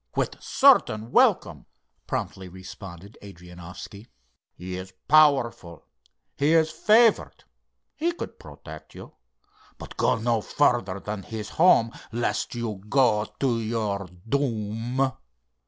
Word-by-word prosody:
"With - - -2
certain 110 +2 +3
welcome," - - +2 0.4
promptly 95 -1 -4
responded 95 +1 -11
Adrianoffski. 90 +2 -11 0.5
"He 90 +1 -7
is 95 +1 -8
powerful, 135 - +3 0.5
he 145 +3 +2
is 160 -1 +3
favored. 220 +6 +3 0.5
He 335 +3 0
could 345 - -8
protect 75 -2 -12
you. - - -11 0.6
But - - -11
go - - +2
no 115 0 0
further 110 -8 +1
than 105 +1 -5
his 110 +1 -7
home, 155 -9 +4 0.2
lest 120 +1 -2
you 110 -5 -4
go 115 -5 +3 0.2
to 125 -4 +1
your 110 -3 -2 0.2
doom. 120 0 -1
110 Hz, 110 wpm, -25 LUFS, 95-130 Hz, 0.6 s, home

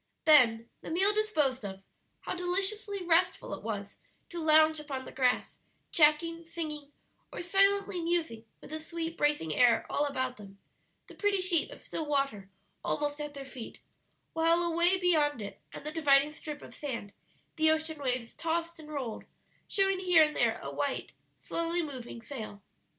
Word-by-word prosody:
Then, 235 -7 +6
the - - -8
meal 385 +5 +3
disposed 305 - +1
of, 195 -1 -7 0.4
how - - -4
deliciously 390 +3 -1
restful 345 +1 +2
it - - -6
was 205 -2 -5 0.3
to 345 -2 -5
lounge 315 0 +5
upon 275 -3 -5
the - - -9
grass, 255 -2 0 0.3
chatting, 330 +1 +3
singing, 300 -4 -5 0.4
or - - -6
silently 395 +1 +3
musing 325 -10 -1 0.2
with - - -12
the 315 - -4
sweet, 330 +1 -5
bracing 295 - +1
air 240 +1 +4
all 290 - +1
about 260 -2 -2
them, 200 -2 -12 0.5
the - - -14
pretty 410 -2 +1
sheet 365 -1 +2
of - - -11
still 315 - -5
water 275 -9 -1 0.3
almost 295 0 -1
at 295 -1 -6
their 275 -1 -7
feet, 255 -3 -9 0.6
while 330 +1 +3
away 345 +2 +3
beyond 310 -7 +2
it 205 -1 -8
and - - -10
the 300 - -2
dividing 290 -2 +4
strip 300 -1 -8
of - - -11
sand 235 -8 -5 0.4
the 315 -1 +4
ocean 315 -1 0
waves 250 -4 -2
tossed 335 +1 -2
and 305 -1 -11
rolled, 265 -7 -5 0.4
showing 390 -1 +2
here 360 -4 +6
and 300 0 0
there - - +2
a - - -5
white, - - -2 0.3
slowly 335 +1 -1
moving 250 -5 -7
sail. 215 -6 -7
305 Hz, 165 wpm, -30 LUFS, 260-340 Hz, 0.6 s, Then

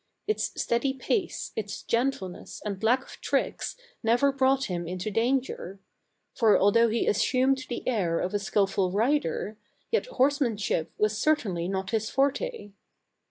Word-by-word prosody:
Its 430 - -1
steady 250 +3 +1
pace, 360 - -2
its 205 -2 -4
gentle 235 -4 0
ness 180 - -10
and 200 -2 -4
lack 245 +4 +3
of - - -14
tricks - - -1 0.3
never 240 +5 +3
brought 270 0 +2
him 175 -5 -3
into 185 +4 -3
danger; 230 -4 -1 0.5
for 225 -4 +4
although 230 +4 +4
he 230 +1 0
assumed 260 +5 +2
the 240 - -5
air 185 -9 +1
of 185 - -2
a 205 - +1
skillful 195 -2 +1
rider, 215 - 0 0.3
yet 465 - +1
horseman 270 - +1
ship 195 -6 -1
was 210 0 +1
certainly 210 - +1
not 190 0 -3
his 220 -1 0
forte. 280 - -1
225 Hz, 150 wpm, -27 LUFS, 195-265 Hz, 0.5 s, for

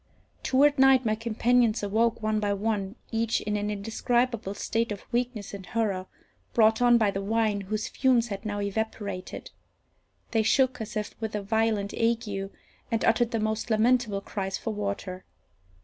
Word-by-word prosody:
Toward 280 +2 +3
night 265 -1 +6
my 215 - +2
companions 230 0 +1
awoke, 225 +3 +1
one 215 0 +1
by 205 -1 0
one, 200 -1 -2 0.2
each 230 0 +1
in 210 0 -2
an 205 0 -1
indescribable 225 +1 -1
state 230 +2 -1
of 200 - -6
weakness 240 -4 -2
and 200 -1 -7
horror, 190 -1 -2 0.5
brought 220 0 +4
on 240 -1 +6
by 215 -3 +2
the 195 - -3
wine, 215 0 0
whose 215 +2 -3
fumes 245 -3 +2
had 200 0 -5
now 205 -2 -3
evaporated. 200 -2 -4 0.8
They 225 - +3
shook 260 +2 +2
as 220 +1 -5
if 210 - -3
with 220 -1 -3
a 205 - -2
violent 220 -1 0
ague, 220 -4 -1 0.4
and 225 - +1
uttered 230 +1 +3
the 230 -2 -1
most 215 +2 -2
lamentable 220 -2 +2
cries 195 -1 -3
for 225 - -4
water. 200 -2 -4
220 Hz, 165 wpm, -27 LUFS, 205-230 Hz, 0.8 s, night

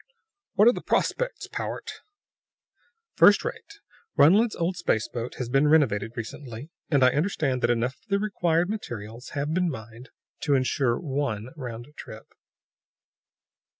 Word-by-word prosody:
"What 210 +2 +6
are - - +9
the - - -5
prospects, - - -1
Powart?" - - -5 1.1
"First - - +6
rate. 445 -4 -6 0.4
Runled's 210 +10 +5
old 170 +2 -1
space 165 -11 0
boat 120 0 -5
has 125 - -4
been 135 +4 +3
renovated 115 -8 +3
recently, 120 +4 -7 0.2
and 140 -4 +3
I 130 - +6
understand 145 -5 0
that 120 - +2
enough 120 +2 0
of - - -35
the 200 -2 +2
required 175 -5 +1
materials 120 - -6
have 145 +2 -1
been 180 0 +1
mined 115 -1 -9 0.3
to 145 -3 +1
insure 130 -2 +1
one 135 -7 -2
round 120 -5 -7
trip." 110 +1 -11
140 Hz, 140 wpm, -26 LUFS, 120-175 Hz, 1.1 s, are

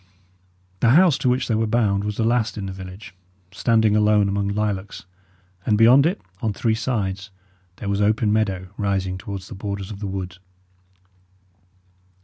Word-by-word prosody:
The 115 - +3
house 165 +3 +6
to 130 - +1
which 125 +1 0
they 115 - 0
were 110 0 +1
bound 105 -3 +1
was 105 0 -3
the 115 - +1
last 115 -1 +1
in 100 - -4
the 95 - -5
village, 95 +1 -10 0.4
standing 110 +1 +2
alone 105 -1 +3
among 100 0 -1
lilacs; 100 -2 -3 0.6
and 105 0 +2
beyond 125 +7 +6
it, 180 - -2 0.2
on 110 -3 -1
three 110 +2 0
sides, 105 -5 -2 0.5
there 100 - -7
was 100 0 0
open 105 +1 +2
meadow 95 -4 -1
rising 95 -2 -1
towards 100 -3 -7
the - - -9
borders 100 0 -5
of 100 - -8
the 100 - -4
wood. 95 -2 -5
105 Hz, 165 wpm, -22 LUFS, 100-115 Hz, 0.6 s, house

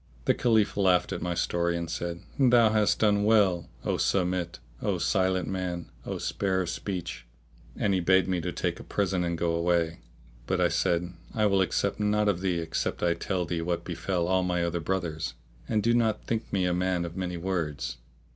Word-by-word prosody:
The - - +4
Caliph 110 -4 +2
laughed 95 -3 +3
at - - -4
my 90 -1 -2
story 85 0 0
and 85 0 -3
said, 85 +1 -4 0.2
"Thou 120 -4 +5
hast 105 -1 +3
done 105 -1 +3
well, 100 -5 +3 0.2
O - - +1
Samit, 90 -2 0 0.2
O - - 0
Silent 95 -2 +1
Man, 90 -2 -3 0.2
O - - -2
spare 95 -2 0
of 85 - -3
speech!"; 90 -10 -5 0.5
and 100 - +1
he 95 - +2
bade 95 +2 +4
me 90 -2 0
take 90 +2 -2
a - - -8
present 95 -3 0
and 85 -1 -1
go 85 0 0
away. 85 -1 +1 0.5
But - - 0
I - - +3
said, 85 +1 0 0.2
"I 110 -1 +2
will 100 -2 +3
accept 95 - 0
naught 105 0 +2
of 90 -3 0
thee 95 -3 0
except 80 0 -2
I 85 -1 +3
tell 90 +1 -2
thee 85 0 -2
what 85 0 -2
befell 90 -3 -1
all 95 0 +3
my 90 -1 0
other 85 0 -1
brothers; 80 -4 -2 0.3
and 110 -2 +1
do 115 - +3
not 115 -3 +1
think 115 -1 -2
me 95 -2 +1
a 90 - +1
man 90 -1 0
of 85 0 -7
many 90 -2 -3
words." 85 -7 -2
90 Hz, 195 wpm, -28 LUFS, 85-100 Hz, 0.5 s, Thou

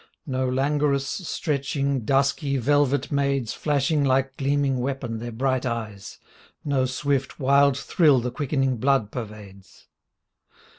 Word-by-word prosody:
No 130 -2 -1
langorous, 140 +1 +1
stretching, 140 - -2
dusky, 140 +1 +1
velvet 145 +2 +1
maids 140 -4 0
Flashing 145 0 0
like 135 0 +1
gleaming 140 -1 0
weapon 125 -3 -3
their 120 +1 -6
bright 130 +2 0
eyes, 110 -5 -5 0.5
No 140 -3 +1
swift, 135 +1 -2
wild 140 0 +4
thrill 145 -2 +3
the 125 +1 -3
quickening 135 -1 -1
blood 130 -3 +1
pervades. 105 -5 -10
135 Hz, 115 wpm, -24 LUFS, 125-140 Hz, 0.5 s, wild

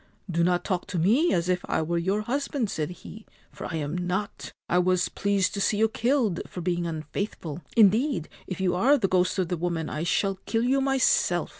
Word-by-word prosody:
' 185 - -10
Do 170 - +4
not 180 0 +2
talk 185 -3 -2
to 185 - -4
me 230 - +3
as 170 -1 +1
if 180 -1 +1
I 160 - 0
were 170 +2 -1
your 195 +5 0
husband/ 265 -1 -2
said 155 0 -2
he, 210 +4 -11
' - - -33
for - - -6
I - - -3
am 150 0 -3
not. 180 +3 -3 0.2
I 175 - +2
was 180 0 +2
pleased 200 -2 0
to 200 - -3
see 205 - +1
you 220 +1 +4
killed 230 -4 0
for - - -8
being 175 -1 -1
unfaithful. 160 0 -5 0.2
Indeed, 215 - +4 0.2
if 185 - -5
you 185 -2 +1
are 255 +11 +4
the 210 -7 +1
ghost 180 +1 +1
of 185 -3 0
the 180 - -1
woman 165 -1 -2
1 155 +2 -3
shall 195 +2 0
kill 225 0 +1
you 270 +2 +2
myself 270 -1 +2
185 Hz, 225 wpm, -26 LUFS, 175-220 Hz, 0.2 s, Do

